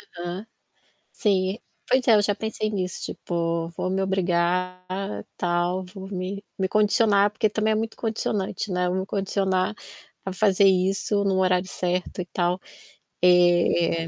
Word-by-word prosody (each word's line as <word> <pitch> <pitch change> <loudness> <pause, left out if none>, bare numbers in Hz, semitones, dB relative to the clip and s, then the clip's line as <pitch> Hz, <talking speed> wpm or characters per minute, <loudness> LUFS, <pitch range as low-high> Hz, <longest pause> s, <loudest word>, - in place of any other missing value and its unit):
Aham. 175 +4 -5 0.7
Sim, 195 -1 +1 0.3
pois 255 0 +2
é, 225 - +7
eu 205 - +5
já 205 0 +1
pensei 215 0 -3
nisso, 185 -3 -3
tipo, 165 -1 -2
vou 180 +2 -3
me 190 +1 0
obrigar, 180 -1 0 0.6
tal, 175 +1 0
vou 190 +1 -9
me, 195 +1 -5 0.2
me 190 - +1
condicionar, 210 0 +3
porque 215 0 +1
também 215 +1 0
é - - +1
muito 225 +1 -3
condicionante, 215 -3 -2
né. 180 0 +1
Vou 190 +1 -1
condicionar 195 -1 0 0.5
para 190 - -4
fazer 200 0 +3
isso 195 +2 +2
num 190 -1 +1
horário 185 0 +2
certo 180 0 -2
e - - -5
tal. 175 +1 0 0.6
Eh, 175 -2 +4
190 Hz, 145 wpm, -25 LUFS, 180-205 Hz, 0.7 s, é